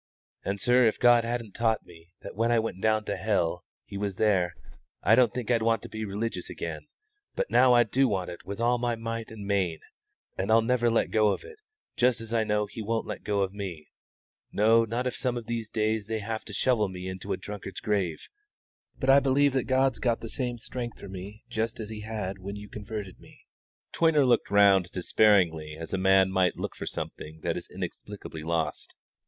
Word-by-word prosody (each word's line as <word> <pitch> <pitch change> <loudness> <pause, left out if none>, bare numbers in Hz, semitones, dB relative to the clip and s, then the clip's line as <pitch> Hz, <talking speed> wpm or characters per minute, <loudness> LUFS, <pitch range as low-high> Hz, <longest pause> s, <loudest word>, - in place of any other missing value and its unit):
And, 100 +1 -2
sir, 120 +3 +4
if 110 - +1
God 120 -1 +6
hadn't 115 -2 -3
taught 110 +1 0
me 85 -1 -16
that - - -9
when 115 +3 +1
I 120 - +4
went 110 -4 -2
down 110 -1 +2
to 100 - -2
hell 90 -5 0 0.2
He 100 -1 -7
was 100 -2 -2
there, 95 -5 +2 0.5
I 105 - +5
don't 120 -1 +5
think 125 -1 -3
I'd 115 -2 +3
want 115 -1 +1
to - - -8
be 110 0 -4
religious 105 +3 -3
again; - - -6 0.5
but - - -2
now 130 -1 +6
I 120 0 +6
do 130 +4 +2
want 95 -5 -2
it 85 - -10
with 100 +3 -6
all 120 +1 +2
my 120 -1 0
might 115 0 -5
and 110 -2 -8
main, 95 -5 0 0.6
and 95 - -1
I'll 115 0 +6
never 120 0 +2
let 115 - +1
go 110 -1 +4
of 105 - 0
it, 455 -2 -13 0.4
just 125 -1 +3
as 115 0 -7
I 115 -1 +3
know 105 -1 +1
He 105 +2 -8
won't 115 +1 -1
let - - -6
go 100 -1 0
of 95 0 -1
me 95 -7 -6 0.6
no, 115 +2 +4
not 120 +3 -2
if 125 - -2
some 125 -1 -1
of 120 - -6
these 115 -1 -3
days 110 -1 0
they 110 0 -1
have 110 +1 -4
to - - -8
shovel 110 0 +2
me 90 0 -7
into 95 -1 -6
a - - 0
drunkard's 95 -1 -7
grave; 95 -6 -1 0.7
but 130 - -2
I 140 - +8
believe 140 0 +3
that 130 -2 0
God's 130 -2 +2
got 120 -1 0
the 115 - -6
same 125 -1 -3
strength 120 +1 -6
for 100 - -9
me 100 +3 -9
just 115 -2 -2
as 110 -1 -6
He 110 - -6
had 105 -3 -4
when 100 +2 -6
you 105 0 -8
converted 105 -2 -7
me." - - -18 0.5
Toyner 160 -4 +4
looked 120 -2 +2
round 100 -3 +5
him - - -23
despairingly 85 -5 +2
as 80 +2 -7
a 95 - 0
man 95 0 +4
might 95 -1 +2
look - - -4
for - - -6
something 80 +1 -6
that 85 0 -1
is 90 - -7
inexplicably 90 -2 -7
lost. 80 0 -2
110 Hz, 215 wpm, -28 LUFS, 95-115 Hz, 0.7 s, I